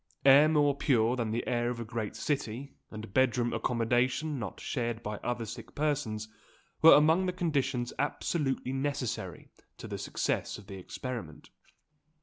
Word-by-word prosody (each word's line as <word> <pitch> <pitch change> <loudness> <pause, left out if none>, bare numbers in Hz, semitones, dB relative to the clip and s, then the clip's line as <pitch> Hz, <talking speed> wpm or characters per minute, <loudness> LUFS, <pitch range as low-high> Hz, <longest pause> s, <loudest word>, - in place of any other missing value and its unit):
Air 140 +3 +8
more 145 -2 +3
pure 120 -4 +2
than 115 -3 -2
the 115 +2 -2
air 120 -1 0
of 120 -1 -4
a 115 - -4
great 110 -2 -4
city, 135 -1 -3 0.2
and 110 -2 -9
bed 130 -2 +3
room 120 -1 0
accommodation 125 +5 0
not 105 -5 -6
shared 120 -3 -3
by 105 -1 -4
other 120 0 -3
sick 115 +2 -9
persons, 135 -8 -1 0.5
were 165 - +10
among 160 +5 +4
the - - +1
conditions 140 -8 -1
absolutely 140 -2 -1
necessary 135 -3 -3 0.3
to - - -8
the - - -5
success - - -2
of 105 - -13
the 95 -1 -8
experiment. 115 - -7
125 Hz, 155 wpm, -30 LUFS, 115-145 Hz, 0.5 s, were